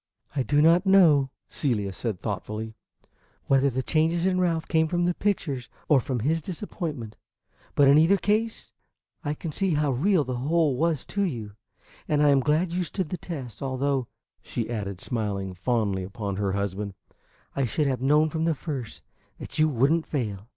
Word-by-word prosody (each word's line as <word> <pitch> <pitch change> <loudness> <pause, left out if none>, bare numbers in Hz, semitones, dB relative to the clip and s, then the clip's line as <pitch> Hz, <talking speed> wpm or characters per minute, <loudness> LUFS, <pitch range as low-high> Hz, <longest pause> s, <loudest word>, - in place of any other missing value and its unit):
"I 140 - +1
do 145 +3 +2
not 170 +4 +5
know," 160 -8 +6 0.2
Celia 105 -9 -1
said 105 -2 -3
thoughtfully, 110 +1 -4 0.7
"whether 135 0 +3
the 130 0 -2
changes 165 +4 +1
in 185 -1 +2
Ralph 165 -3 0
came 160 -1 +2
from 175 +1 0
the 175 - +2
pictures 150 - -2 0.2
or 145 - +5
from 125 -1 -3
his 160 +7 +1
disappointment; 155 - -5 0.6
but 145 - +5
in 140 +2 +7
either 170 +6 +5
case 215 +3 -1 0.5
I 145 0 -2
can 160 +1 -5
see 185 +1 0
how 150 -1 +1
real 165 +6 +2
the 125 -2 -3
whole 150 +2 +2
was 160 0 0
to 200 - 0
you, 120 - -2 0.6
and 150 -1 +2
I 145 - +5
am 140 -1 +5
glad 155 +6 +1
you 180 +1 0
stood 180 0 -3
the 180 - -3
test; 140 -9 -7
although," 135 -1 -1 0.3
she 115 0 -4
added, 100 -5 -4
smiling 100 -5 -3
fondly 100 -1 0
upon 100 +1 -4
her 100 -2 0
husband, 100 0 -3 0.6
"I 135 - +1
should 150 +6 0
have 130 -3 -1
known 150 +3 +3
from 160 +1 -1
the 165 -1 +2
first 135 -6 -6 0.3
that - - -7
you 155 0 +5
would 135 +1 +2
n't 165 -1 +1
fail." 110 -6 -3
140 Hz, 180 wpm, -26 LUFS, 115-165 Hz, 0.7 s, in